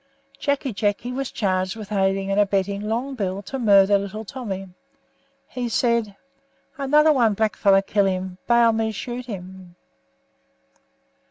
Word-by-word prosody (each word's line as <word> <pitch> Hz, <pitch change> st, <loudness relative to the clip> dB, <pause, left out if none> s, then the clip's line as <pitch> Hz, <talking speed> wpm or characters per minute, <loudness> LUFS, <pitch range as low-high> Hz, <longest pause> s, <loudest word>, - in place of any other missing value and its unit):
Jacky 280 Hz, -3 st, -1 dB
Jacky 205 Hz, +4 st, -1 dB
was 270 Hz, +1 st, -3 dB
charged 185 Hz, -1 st, -1 dB
with 215 Hz, -2 st, -9 dB
aiding 195 Hz, -1 st, 0 dB
and 195 Hz, -, +1 dB
abetting 200 Hz, 0 st, +1 dB
Long 235 Hz, +6 st, -2 dB
Bill 200 Hz, -4 st, -3 dB
to 270 Hz, +6 st, -5 dB
murder 200 Hz, -3 st, +5 dB
little 205 Hz, +3 st, -6 dB
Tommy. 195 Hz, -5 st, -6 dB, 0.8 s
He 245 Hz, -2 st, -4 dB
said: 230 Hz, -3 st, 0 dB, 0.6 s
"Another 300 Hz, +2 st, +4 dB
one 230 Hz, -6 st, +2 dB
blackfellow 200 Hz, -2 st, +3 dB
killed 200 Hz, 0 st, +2 dB
him, 185 Hz, 0 st, -4 dB
baal 235 Hz, -1 st, +5 dB
me 220 Hz, 0 st, -1 dB
shoot 245 Hz, +3 st, -6 dB
him." 185 Hz, -3 st, -9 dB
205 Hz, 135 wpm, -23 LUFS, 195-240 Hz, 0.8 s, murder